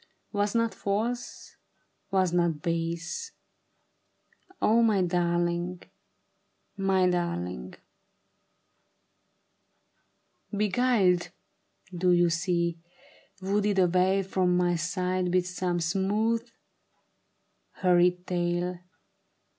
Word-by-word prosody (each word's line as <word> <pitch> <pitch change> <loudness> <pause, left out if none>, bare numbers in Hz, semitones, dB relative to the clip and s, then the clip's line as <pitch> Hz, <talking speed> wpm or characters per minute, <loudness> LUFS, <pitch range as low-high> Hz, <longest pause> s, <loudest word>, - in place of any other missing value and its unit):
Was 205 +1 -1
not 230 -1 +1
false, 230 +5 -3 0.5
was 185 -2 +1
not 170 -4 +1
base, 170 - -3 1.3
O 230 +2 +4
my 210 -5 +3
darling! 175 0 -1 0.9
my 190 -1 +2
darling! 90 - -2 2.8
Beguiled, 205 -4 +2 0.7
do 180 +1 +1
you 175 -1 +3
see 170 0 0 0.3
— - - -29
Wooed 205 +1 +1
away 185 +2 +3
from 185 -1 +1
my 175 -1 +2
side 180 +2 -1
with 180 0 +2
some 180 -1 -2
smooth, 210 +7 0 1.2
hur 180 -1 +2
ried 180 0 +2
tale. 175 0 -1
180 Hz, 85 wpm, -27 LUFS, 175-195 Hz, 2.8 s, O